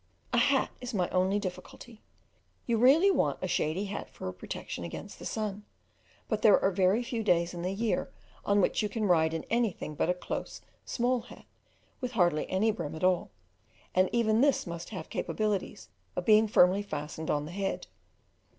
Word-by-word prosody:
A - - +4
hat - - +3
is 250 -2 -5
my 180 -3 +1
only 185 +2 +2
difficulty: 205 +3 -7 0.6
you 230 -2 +1
really 300 - +6
want - - +1
a 185 - -3
shady 175 +2 0
hat 200 0 -5
for - - -8
a 90 - -4
protection 90 -1 -6
against 85 - -8
the - - -5
sun, 210 -2 -3 0.6
but 215 -2 -1
there 210 -3 +6
are 195 - +2
very 190 +5 +2
few 235 -1 -3
days 170 -4 +2
in 175 - -5
the 180 - -1
year 215 +3 -1 0.3
on 200 0 +3
which - - +1
you 210 - -1
can 215 0 -2
ride 160 -4 +3
in 165 -1 -4
anything 225 -9 0
but 150 - 0
a 180 - +2
close, 180 - -5 0.2
small 245 0 0
hat, 235 - -14 0.5
with 250 -2 -4
hardly 175 -7 +2
any 205 +4 +2
brim 170 -8 -5
at 160 - -7
all, 185 -1 +2 0.6
and 185 0 +3
even 225 -1 +2
this 280 -1 +3
must 170 0 -6
have 185 -7 -6
capabilities 210 -3 -2 0.3
of 180 - -3
being 215 0 +6
firmly 190 -1 +5
fastened 155 -4 -5
on 145 0 0
the 155 - -8
head. 195 +1 -3
195 Hz, 185 wpm, -30 LUFS, 175-220 Hz, 0.6 s, really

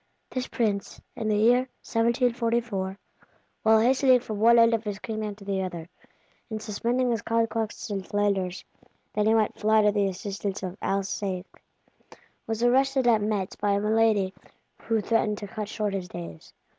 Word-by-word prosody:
This 255 -1 -3
Prince, 210 -5 -2 0.2
in 220 - -3
the 210 - +2
year 245 +4 +4 0.2
1744, 230 -4 0 0.6
while 220 0 +5
hastening 255 +2 +4
from 215 -4 -6
one 235 +2 +6
end 230 0 +6
of 225 -1 0
his 205 -2 -4
kingdom 215 -1 -4
to 200 -1 -14
the 195 -1 -1
other, 175 -3 -5 0.6
and 220 -1 -4
suspending 235 +4 -1
his 225 -3 -1
conquests 225 -1 -1
in 195 -1 -2
Flanders 195 -2 -1 0.5
that 210 0 +1
he 220 - +5
might 220 -2 +1
fly 215 0 +4
to 210 - +4
the 205 -1 +1
assistance 195 +1 -4
of 185 -1 -4
Alsace, 195 -1 -2 1.0
was 225 +1 -2
arrested 265 +2 +3
at 225 -3 +4
Metz 205 -3 -1
by 205 -1 0
a 200 - +2
malady 210 -2 +2 0.5
which 225 -3 +1
threatened 220 -2 +1
to 205 - -7
cut 210 +1 -5
short 210 -2 -2
his 190 -2 -3
days. 85 - -9
215 Hz, 165 wpm, -26 LUFS, 200-230 Hz, 1.0 s, one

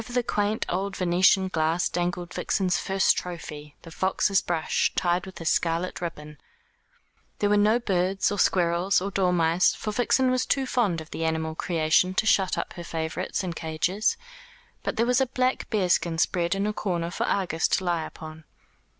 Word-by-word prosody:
Over 245 - -11
the 245 0 +1
quaint 210 -1 -1
old 195 +2 -2
Venetian 185 +1 +3
glass 165 0 +1
dangled 175 0 -3
Vixen's 185 -3 0
first 195 0 +2
trophy, 150 -4 -7
the 165 - -11
fox's 190 +3 +1
brush, 165 -2 0
tied 175 +1 0
with 190 - -10
a 165 - -7
scarlet 165 +3 0
ribbon. 150 -3 -7 1.0
There 205 0 +1
were - - +5
no 210 +3 +4
birds, 195 -4 0
or 205 - -3
squirrels, 175 +2 +2
or 195 +2 -4
dormice, 180 -2 +2
for 215 - -4
Vixen 255 +3 +2
was 255 -2 +1
too 270 -1 +1
fond 210 -10 0
of 160 - -13
the 165 - -4
animal 160 0 -1
creation 170 +3 +1
to 220 - +1
shut 195 -3 +3
her 175 - -5
favourites 165 +3 -3
up 185 - -3
in - - -4
cages; 165 +6 -1 0.6
but - - -3
there 230 - +3
was 250 +2 +2
a 265 - +2
black 255 +1 -1
bearskin 180 -5 +1
spread 175 +2 +1
in 195 +1 -1
a 210 - -1
corner 175 -5 -2
for - - -2
Argus 180 -5 0
to 190 - 0
lie 170 -3 0
upon. 155 0 -10
180 Hz, 180 wpm, -26 LUFS, 165-200 Hz, 1.0 s, were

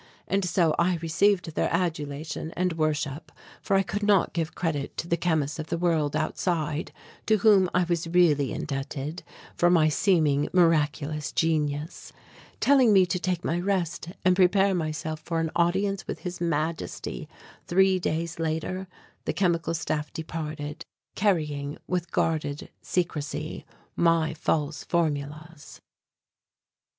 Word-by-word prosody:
And 195 0 +1
so 170 -2 +2
I 175 +1 +3
received 170 +2 +1
their - - 0
adulation 160 -3 -2
and 180 -1 +1
worship, 155 -1 -2 0.3
for 195 - +1
I 195 - +4
could 205 +2 -3
not 205 -3 +3
give 165 -1 -2
credit 150 -5 -2
to 165 - -3
the 170 - +2
chemists 160 -3 0
of 155 - -4
the 170 - -2
world 160 -4 +1
outside 155 0 -1 0.4
to 220 - +4
whom 200 -3 +5
I 180 - +4
was 170 -1 -1
really 165 -6 +3
indebted 140 +3 -4 0.3
for 175 - +3
my 160 -3 +4
seeming 155 -4 +2
miraculous 155 -3 +2
genius. 155 -1 -1 0.5
Telling 265 -6 +5
me 190 -2 +6
to 180 +1 -2
take 180 -1 -2
my 170 - 0
rest 175 -3 -1 0.2
and 185 0 +5
prepare 195 +1 +4
myself 155 -2 -3
for 165 +1 -3
an 160 -1 -1
audience 190 +3 +1
with - - -5
His 180 -2 -6
Majesty 160 -1 -3 0.4
three 190 +1 +4
days 170 0 -2
later, 165 +4 -2 0.4
the - - -1
Chemical 170 -3 +1
Staff 150 -1 -2
departed, 155 -2 -5 0.3
carrying, 150 -7 0
with 180 -1 -2
guarded 150 -3 -1
secrecy, 165 -5 -3 0.3
my 165 -2 +2
false 155 -1 -1
formulas. 155 -1 -3
165 Hz, 135 wpm, -26 LUFS, 155-180 Hz, 0.5 s, me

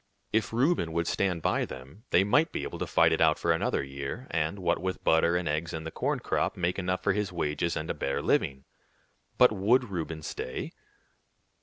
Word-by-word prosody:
If 110 0 +1
Reuben 120 - +1
would 85 0 0
stand 90 -2 0
by - - +1
them, 65 - -10
they 90 - +4
might 145 +11 +3
be - - -3
able - - -6
to - - -2
fight - - +4
it - - +1
out 80 -1 +5
for 85 - +1
another 80 -3 0
year, 70 - -6
and, 80 +4 -1
what 90 -3 0
with 95 0 -3
butter 80 +1 +3
and 90 - -2
eggs 75 +2 -2
and 80 0 -5
the 80 - -5
corn - - -1
crop, - - -1
make 90 +1 0
enough 90 0 -2
for 95 - +3
his 105 -2 -1
wages 85 0 -1
and 80 - -4
a - - -1
bare 70 0 -2
living. 65 -1 +1 0.7
But 125 -2 +7
would 110 +4 +2
Reuben 80 -3 -4
stay? - - -5
85 Hz, 205 wpm, -28 LUFS, 80-100 Hz, 0.7 s, But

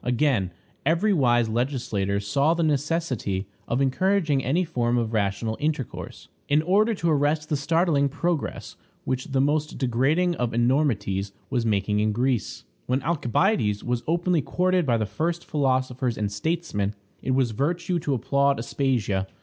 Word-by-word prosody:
Again, 125 -6 +1 0.3
every 170 +8 +2
wise 120 -7 +3
legislator 110 -5 -1
saw 140 +11 +1
the 170 - 0
necessity 145 - -1 0.2
of 120 +3 0
encouraging 150 0 +1
any 165 +8 +1
form 120 -6 0
of 115 -1 -1
rational 110 +1 0
intercourse, 150 -4 -4 0.2
in 150 +2 +3
order 210 +6 +3
to 170 -3 -1
arrest 150 +1 +1
the 150 - +1
startling 145 -1 +2
progress 165 +2 -3 0.3
which 130 0 -2
the 135 -1 -1
most 150 +2 0
degrading 140 +8 +1
of 120 -2 -1
enormities 115 -6 +1 0.2
was 120 -3 0
making 105 0 +1
in 105 0 +1
Greece. 125 -1 -1 0.2
When 130 +2 0
Alcibiades 145 - +1
was 120 -1 -1
openly 175 0 +1
courted 180 +2 +1
by 120 -2 +3
the 110 - 0
first 165 - -2
philosophers 130 -4 0
and 105 -1 -1
statesmen, 105 - -2 0.3
it 130 - 0
was 130 -3 +2
virtue 170 - -1
to 145 -3 -1
applaud 140 +3 +2
Aspasia. 115 -6 -1
135 Hz, 150 wpm, -25 LUFS, 115-160 Hz, 0.3 s, wise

